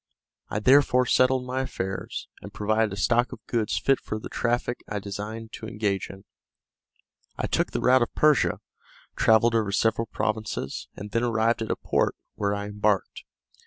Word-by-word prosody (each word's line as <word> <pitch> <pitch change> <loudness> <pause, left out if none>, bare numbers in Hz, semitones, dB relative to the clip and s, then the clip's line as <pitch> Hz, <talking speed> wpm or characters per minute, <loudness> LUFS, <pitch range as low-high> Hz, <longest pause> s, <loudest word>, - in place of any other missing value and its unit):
I - - -2
therefore 130 +1 +5
settled 130 +1 +3
my 130 +1 -2
affairs, 95 -7 -4
and - - -9
provided 110 +1 +1
a - - -4
stock 120 +5 +2
of - - -10
goods 115 -3 -1
fit 135 -1 +2
for 110 - -5
the 110 - -8
traffic 120 0 -1
I 105 - -2
designed 105 +3 -6
to 110 - -7
engage 105 -3 -2
in. 95 +1 -12 1.1
I - - -1
took - - 0
the - - -3
route 130 0 +5
of 120 - -1
Persia, 150 -2 +3 0.5
travelled 110 +1 +4
over 110 -3 +1
several 115 +2 +1
provinces, 110 -11 -3
and 105 +1 -8
then 115 - +1
arrived 115 -1 +1
at 110 - -3
a - - +1
port, - - 0 0.2
where 100 0 -1
I 100 0 -4
embarked. 105 -1 -1
110 Hz, 170 wpm, -26 LUFS, 105-120 Hz, 1.1 s, therefore